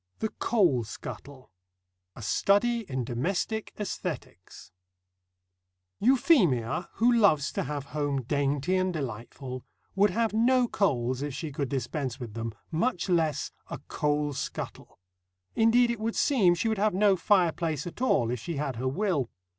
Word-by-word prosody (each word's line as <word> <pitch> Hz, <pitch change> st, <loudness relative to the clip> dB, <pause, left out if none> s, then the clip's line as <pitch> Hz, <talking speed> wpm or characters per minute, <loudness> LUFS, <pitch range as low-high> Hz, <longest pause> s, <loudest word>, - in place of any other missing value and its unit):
THE 220 Hz, -, -2 dB
COAL 180 Hz, -, +2 dB
SCUTTLE 130 Hz, +4 st, -9 dB, 0.6 s
A 120 Hz, -, -9 dB
STUDY 215 Hz, -, +2 dB
IN 130 Hz, -1 st, -2 dB
DOMESTIC 175 Hz, -, -2 dB
ÆSTHETICS 210 Hz, -, -6 dB, 1.3 s
Euphemia, 195 Hz, -, +3 dB
who 235 Hz, +2 st, +3 dB
loves 200 Hz, -, +4 dB
to -, -, -2 dB
have 145 Hz, -2 st, -4 dB
home 145 Hz, -3 st, -1 dB
dainty 145 Hz, +6 st, 0 dB
and 185 Hz, 0 st, +1 dB
delightful, 130 Hz, -2 st, -6 dB, 0.3 s
would 200 Hz, +2 st, +4 dB
have 225 Hz, +3 st, 0 dB
no 245 Hz, +3 st, +3 dB
coals 130 Hz, -, 0 dB
if 145 Hz, -2 st, -3 dB
she 155 Hz, 0 st, -5 dB
could 140 Hz, -1 st, -3 dB
dispense 130 Hz, 0 st, -3 dB
with 120 Hz, -4 st, -7 dB
them, 115 Hz, 0 st, -4 dB, 0.2 s
much 180 Hz, +2 st, 0 dB
less 160 Hz, -5 st, +1 dB, 0.2 s
a -, -, -4 dB
coal 150 Hz, 0 st, 0 dB
scuttle. -, -, -6 dB, 0.6 s
Indeed, 235 Hz, +2 st, +4 dB
it 235 Hz, -, -4 dB
would 225 Hz, +1 st, -2 dB
seem 205 Hz, -12 st, +4 dB
she 175 Hz, -, -1 dB
would 220 Hz, -2 st, 0 dB
have 210 Hz, -2 st, +2 dB
no 200 Hz, 0 st, +4 dB
fireplace 170 Hz, -5 st, +1 dB
at 175 Hz, -, -8 dB
all, 120 Hz, -, +2 dB
if 125 Hz, -, -2 dB
she 170 Hz, +8 st, -5 dB
had 140 Hz, -4 st, -3 dB
her 130 Hz, +2 st, -2 dB
will. 155 Hz, -, 0 dB
165 Hz, 145 wpm, -28 LUFS, 135-210 Hz, 1.3 s, loves